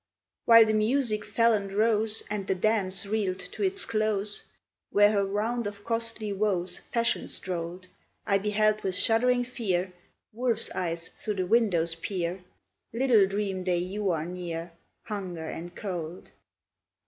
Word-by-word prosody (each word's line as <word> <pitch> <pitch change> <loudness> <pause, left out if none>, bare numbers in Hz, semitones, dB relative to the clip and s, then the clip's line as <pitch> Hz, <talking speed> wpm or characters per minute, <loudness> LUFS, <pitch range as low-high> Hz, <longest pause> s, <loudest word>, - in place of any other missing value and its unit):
While 230 -1 +9
the 220 - +1
music 215 0 +1
fell 230 +2 +3
and 200 -2 -1
rose, 215 +1 +1
And 205 -2 -4
the 190 - +1
dance 195 0 0
reeled 200 -3 -1
to 190 - -8
its 390 0 0
close, 215 -1 0 0.4
Where 205 +1 +5
her 200 -2 +2
round 210 +4 -1
of 205 0 -8
costly 230 -2 -1
woes 190 -3 0
Fashion 235 0 +1
strolled, 180 0 -4 0.4
I 200 -1 +2
beheld 215 +1 +1
with 190 -1 -1
shuddering 245 +4 +3
fear 190 -7 -2 0.4
Wolves' 235 -1 +1
eyes 170 -2 -3
through 210 - -4
the 185 -1 -1
windows 180 -6 +2
peer; 180 +1 -3 0.5
Little 230 -4 +4
dream 195 -1 -2
they 180 -1 +1
you 190 +3 -2
are 160 -3 0
near, 170 -1 -5 0.3
Hunger 185 -6 -5
and 175 +2 -7
Cold! 175 -4 -6
205 Hz, 145 wpm, -28 LUFS, 185-220 Hz, 0.5 s, While